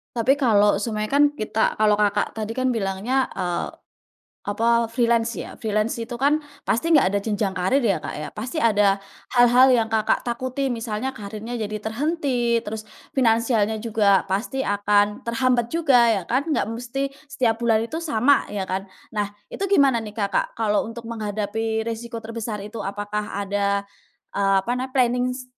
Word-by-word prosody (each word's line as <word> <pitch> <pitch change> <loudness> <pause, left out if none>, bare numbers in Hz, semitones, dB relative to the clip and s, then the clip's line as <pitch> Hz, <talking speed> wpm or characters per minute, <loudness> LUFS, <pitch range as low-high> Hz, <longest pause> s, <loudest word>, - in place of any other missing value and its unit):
Tapi 240 +4 +3
kalau 210 -5 +4
seumpamanya 215 -1 -2
kan 290 - +7
kita 220 -3 0
kalau 210 -1 +3
Kakak 205 -1 +1
tadi 220 +1 -3
kan 255 0 +1
bilangnya, 225 +5 0
eee, 175 -1 -2 0.7
apa 230 +3 +1
freelance 235 0 +1
ya. - - -6
Freelance 215 +1 -1
itu 235 +1 -5
kan 285 +5 +2 0.2
pasti 240 +9 0
nggak 190 -8 +3
ada 200 - +2
jenjang 205 -2 -1
karier 195 +9 +1
ya, 195 -7 +2
Kak - - -6
ya, 150 +1 -5
pasti 245 +9 -6
ada 205 -7 +3 0.4
hal-hal 245 +2 +7
yang 230 -3 +3
Kakak 215 -1 +1
takuti. 255 +3 -2
Misalnya 230 +2 -3
kariernya 215 +3 -7
jadi 215 0 -3
terhenti, 245 0 0
terus 215 +1 -5 0.3
finansialnya 225 -3 +2
juga 205 -3 +3
pasti 220 +8 -2
akan 205 0 +2
terhambat 240 0 +1
juga 275 -8 +4
ya 205 -4 +2
kan, 275 +6 0
nggak 295 - +1
mesti 260 +4 -3 0.2
setiap 235 -5 0
bulan 225 -1 +2
itu 315 +7 -5
sama, 285 -3 +2
ya 200 -2 -2
kan. 190 +1 -3 0.2
Nah 210 -2 -1 0.2
itu - - -7
gimana 275 -10 +4
nih 215 -1 -9
Kakak 200 -2 -1
kalau 210 -1 +1
untuk 230 0 -8
menghadapi 220 0 -2
resiko 230 +1 -5
terbesar 220 -2 -5
itu? 215 +1 -7
Apakah 205 0 -3
ada, 200 0 0 0.5
eee, 195 -1 +2
apa 240 - -1
nam 255 +1 -3
plannings 250 0 0
225 Hz, 160 wpm, -23 LUFS, 210-245 Hz, 0.7 s, kan